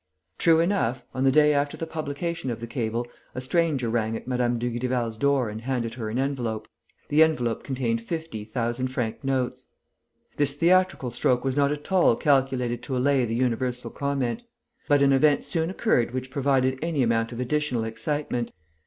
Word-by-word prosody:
"LUPIN." 80 +1 -14
True 165 -1 +6
enough, 165 - 0
on 130 +1 0
the 135 - +5
day 150 +1 +5
after 145 0 0
the 165 - -3
publication 160 0 -4
of 115 - -3
the 115 - -5
cable, 115 -1 -2 0.3
a - - -2
stranger 145 -2 +1
rang 115 -1 0
at - - -12
Mme. 125 -1 +1
Dugrival's 120 -1 -1
door 135 +1 +2
and 105 +1 -6
handed 120 -2 -2
her 115 -3 -4
an 110 - -3
envelope. 125 -5 -2 0.4
The 150 +2 +4
envelope 125 -8 +2
contained 120 -4 -1
fifty 160 -4 -5
thousand 120 +3 -2
franc 120 -2 -3
notes. 130 -1 -1 0.7
This 145 -1 +2
theatrical 175 -5 +2
stroke 125 +1 +1
was 135 -1 -1
not 140 0 +3
at 150 +4 -5
all 180 -10 +5
calculated 130 -4 +1
to 130 -3 -3
allay 135 0 +3
the 115 0 -2
universal 125 0 -1
comment. 140 - -2 0.5
But 145 -2 +4
an 140 0 +5
event 145 +1 +3
soon 165 -2 -1
occurred 130 - +1
which 130 0 -4
provided 130 -1 +1
any 160 -4 0
amount 115 0 +1
of 120 - -6
additional 125 -2 0
excitement. 120 +2 -2
130 Hz, 180 wpm, -26 LUFS, 120-145 Hz, 0.7 s, True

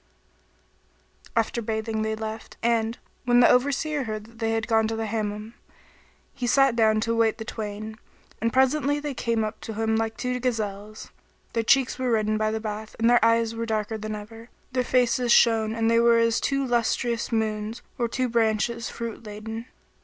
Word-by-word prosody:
"[FN#18] - - -31
After 235 +2 -5
bathing 220 0 -2
they 220 0 -1
left; 220 0 -7
and, 230 0 +1 0.3
when 245 0 +4
the 245 - +7
Overseer 285 +2 +1
heard 215 -1 -4
that 225 +1 -17
they 225 -1 0
had 225 0 0
gone 220 -1 +3
to 225 - -2
the 225 0 -2
Hammam, 215 0 -3 0.8
he 255 -3 -3
sat 270 -1 +4
down 220 -2 +3
to 230 - -1
await 225 -1 +2
the 220 - -6
twain, 215 0 -6 0.4
and 230 +1 +1
presently 285 +3 +2
they 290 -1 -4
came 230 -2 0
up 215 0 -5
to 220 - -6
him 220 0 0
like 225 0 -1
two 250 0 -2
gazelles; 215 -4 -4 0.4
their 230 - +1
cheeks 260 +3 +2
were 255 -1 0
reddened 215 -2 +1
by 215 0 +1
the 220 0 -2
bath 215 0 -6
and 230 +1 +3
their 240 - +5
eyes 230 0 +3
were 230 0 -4
darker 220 0 -1
than 215 0 -4
ever; 225 +3 -10 0.2
their 255 -1 +1
faces 245 -1 +2
shone 225 -2 +4
and 225 -1 +1
they 230 - +4
were 235 0 +5
as 230 0 +3
two 275 -1 0
lustrous 235 -1 0
moons 220 0 -2 0.2
or 240 - +1
two 255 +2 -1
branches 230 0 0
fruit 230 0 -6
laden. 220 +2 -7
225 Hz, 190 wpm, -25 LUFS, 220-240 Hz, 0.8 s, the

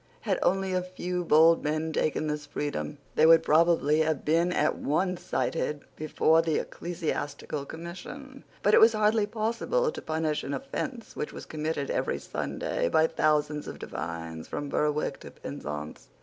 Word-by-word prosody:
Had - - 0
only 190 0 +1
a 185 - +1
few 180 0 -3
bold 165 +1 +5
men 155 +2 -1
taken 155 0 0
this 150 -1 -3
freedom, 145 0 -3 0.2
they 155 - +5
would 165 0 +7
probably 160 -1 +4
have 160 -2 0
been 165 +3 +3
at - - +2
once 180 +5 -1
cited 150 -3 -2
before 155 +1 +3
the 165 -2 0
Ecclesiastical 150 -4 -4
Commission; 260 - -9 0.2
but 205 - +4
it - - +8
was 225 +1 +8
hardly 215 0 +2
possible 235 - 0
to - - -7
punish 155 -1 -1
an 140 - -3
offence 260 -3 -5
which 150 - -3
was - - -8
committed 155 -2 -3
every - - 0
Sunday 85 - -2
by 160 - +4
thousands 150 -1 +1
of - - -6
divines, 80 -1 -6
from 145 - -4
Berwick 150 +1 0
to - - -10
Penzance. 75 -2 -7
160 Hz, 160 wpm, -28 LUFS, 150-180 Hz, 0.2 s, it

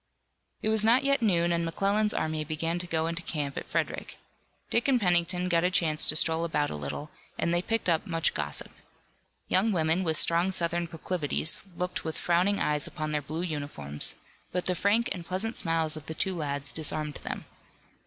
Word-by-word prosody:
It 215 - +2
was 220 -1 +3
not 235 +4 +5
yet 275 -1 +2
noon 175 -6 +2
and 170 0 +1
McClellan's 200 +5 +1
army 155 -1 -1
began 165 +3 -2
to 175 - -1
go 160 -2 0
into 170 +2 -2
camp 145 -4 -3
at - - -6
Frederick. - - -2 0.5
Dick 235 - +2
and 265 -3 +4
Pennington 180 -2 +2
got 170 -1 +2
a 180 - +3
chance 160 -4 +2
to - - +3
stroll 160 +1 +3
about 150 -3 0
a - - -2
little, 75 - -5 0.3
and 170 - 0
they 175 - +3
picked 225 +2 -1
up 165 -2 +1
much 165 -2 +2
gossip. 75 -1 -3 0.8
Young 210 +4 +3
women, 165 0 +1
with 160 -3 +1
strong 170 +2 +4
Southern 170 -2 0
proclivities, 165 -1 -1 0.2
looked 180 0 -3
with 160 0 -3
frowning 180 +4 +2
eyes 150 -1 +1
upon 155 0 -4
their 150 -1 0
blue 155 +4 -4
uniforms, 145 - -1 0.4
but 180 0 -2
the 180 - +2
frank 205 +6 +2
and 175 - -3
pleasant 190 +7 -3
smiles 165 -3 +1
of 155 -1 -9
the 160 - -5
two 190 - +1
lads 145 -3 -1
disarmed 155 -1 -1
them. - - -5
170 Hz, 195 wpm, -28 LUFS, 155-185 Hz, 0.8 s, not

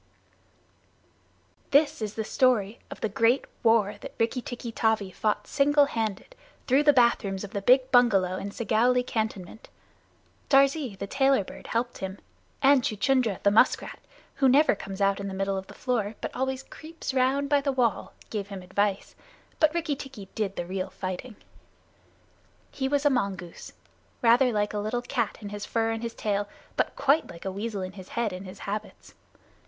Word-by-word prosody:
This 285 -3 +3
is 210 -1 -4
the 220 - -2
story 230 -2 +1
of - - -9
the - - +1
great 230 +5 +2 0.2
war 225 -3 +3
that - - -9
Rikki 230 +3 0
tikki 240 -1 -6
tavi 220 -4 0
fought 210 +1 -1
single 290 0 +3
handed, 225 - -3 0.3
through 270 +3 +4
the 295 0 +6
bath 240 -4 +4
rooms 195 -1 -4
of 200 - -7
the 200 - -3
big 255 +4 +4
bungalow 200 -8 +4
in 200 - -5
Segowlee 235 +4 +1
cantonment. 220 -4 -4 0.8
Darzee, 275 -4 +3
the 200 - -4
Tailorbird, 270 -2 0
helped 240 +1 -2
him, 190 +1 -5 0.5
and 275 0 +6
Chuchundra, 235 -2 +1
the 200 - +4
musk 210 - +4
rat, - - -9 0.4
who 270 - +4
never 290 +4 +5
comes 195 -1 -7
out 195 0 +2
into 200 - -4
the - - -6
middle 195 0 0
of 190 0 -5
the - - -13
floor, 225 -4 -1
but - - -5
always 265 +1 -2
creeps 320 0 -7
round 265 +2 +2
by 285 0 +3
the 275 0 0
wall, 245 -6 0 0.2
gave 205 -3 -3
him 195 -2 -8
advice, 200 +2 -1 0.5
but 310 -1 +5
Rikki 330 -3 -1
tikki 265 -8 -10
did 200 -3 -2
the 175 - -3
real 185 +1 -3
fighting. 185 +5 -6 1.4
He 265 - -2
was 285 +1 0
a 290 - +5
mongoose, 190 -8 -3 0.5
rather 245 +2 +5
like 210 -1 0
a 210 - -1
little 220 +4 -2
cat 240 -4 -2
in 205 - -6
his 205 0 -6
fur 225 -1 0
and 225 0 -3
his 235 -1 -5
tail, 205 -1 -1 0.3
but - - 0
quite 290 +4 +2
like 170 +1 -11
a 190 - -2
weasel 200 0 -4
in 185 - -5
his 190 -1 -12
head 230 -4 0
and 185 +1 -7
his 185 +1 -11
habits. 210 +1 -6
225 Hz, 180 wpm, -27 LUFS, 200-260 Hz, 1.4 s, the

